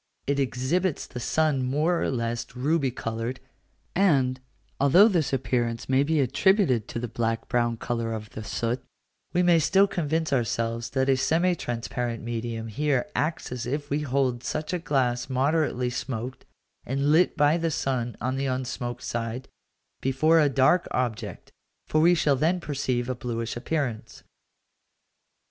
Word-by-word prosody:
It 140 0 0
exhibits 140 +7 0
the 125 - -8
sun 150 +1 +1
more 150 +7 +1
or - - 0
less 120 -1 -3
ruby 140 +2 +1
coloured; 115 +1 -4 0.6
and, 135 -9 +3 0.4
although 160 +10 +7
this 165 - +1
appearance 120 -3 -1
may 130 +1 +3
be 155 +2 +1
attributed 140 - +2
to - - -5
the 120 +1 -3
black 115 0 -2
brown 120 -2 +1
colour 115 -1 -2
of 110 -1 -6
the 110 - -7
soot, 115 +5 -2 0.5
we 180 0 +2
may 175 -2 +5
still 190 +5 +4
convince 160 -4 -1
ourselves 115 -1 -1
that 130 0 +2
a 135 - +4
semi 170 +7 +2
transparent 120 -4 -3
medium 115 -1 -4
here 135 +4 0
acts 155 -2 -1 0.2
if 145 +2 -3
we 145 - +1
hold 130 -4 0
such 155 +6 -3
a 180 - 0
glass 125 -6 0
moderately 135 -2 +1
smoked, 125 0 -5 0.4
and 140 +3 0
lit 170 +4 +4
by 150 +2 +4
the 165 0 0
sun 125 -5 -2
on 130 +2 -2
the 135 0 -1
unsmoked 130 -1 -3
side, 120 +2 -4 0.5
before 155 +5 +3
a 150 -2 +4
dark 135 +7 +3
object, 115 -4 -3 0.4
for 155 - +2
we 175 +2 +6
shall 150 -3 +3
then 165 +7 +1
perceive 135 -6 -2
a 130 - -1
bluish 115 -2 -4
appearance. 125 -3 -3
130 Hz, 155 wpm, -26 LUFS, 120-155 Hz, 0.6 s, although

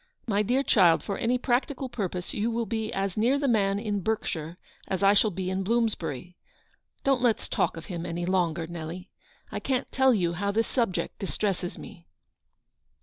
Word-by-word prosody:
My 205 -3 +1
clear 250 +6 +2
child, 180 -10 +5
for 200 - -3
any 245 +2 +2
practical 260 +2 0
purpose 185 -7 -4
you 215 +3 0
will 230 0 -1
be 220 0 -2
as 195 0 -2
near 240 +6 +3
the 280 0 0
man 200 -5 +2
in 205 -1 -1
Berkshire 175 -6 -2 0.3
as 190 0 -1
I 195 +1 +7
shall 210 +1 +4
be 185 -1 -3
in 190 +1 -1
Blooinsbury. 190 - -1 0.7
Don't 270 -2 +2
let's 235 -4 +2
talk - - 0
of 165 - -8
him 175 -3 -5
any 175 0 -3
longer, 175 -3 +1
Nelly. 170 +2 -7 0.4
I - - -3
can't 260 -2 -1
tell 265 0 +4
you 175 -7 +1
how 200 +4 -1
this 225 +3 +2
subject 230 -8 -1
distresses 195 -2 -2
me." 170 - -11
200 Hz, 180 wpm, -27 LUFS, 180-230 Hz, 0.7 s, I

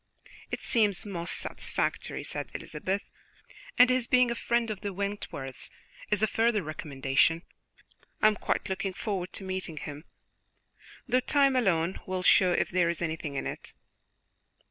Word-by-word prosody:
"It - - -4
seems 210 -6 +3
most 175 -3 -2
satisfactory," - - -1
said - - -4
Elizabeth, 195 +2 -3 0.7
"and 250 0 +7
his 255 -2 +1
being 250 -1 +4
a - - +1
friend 235 -1 0
of 205 - -6
the 200 - -3
Wentworths 190 -9 -4 0.4
is 210 0 +2
a - - +8
further 225 -1 +1
recommendation. 150 +1 +1 0.8
I - - +2
am 215 0 +6
quite - - -1
looking 190 0 -2
forward 190 -2 -3
to - - -4
meeting 185 -4 -3
him, 145 +1 -7 1.0
though 255 0 +3
time 275 +1 +3
alone 185 -7 +1
will 185 -1 -2
show 185 0 +6
if 175 - +1
there 175 -2 +3
is 170 - -2
anything 160 -3 -3
in 135 - -2
it." - - -6
190 Hz, 150 wpm, -29 LUFS, 170-220 Hz, 1.0 s, a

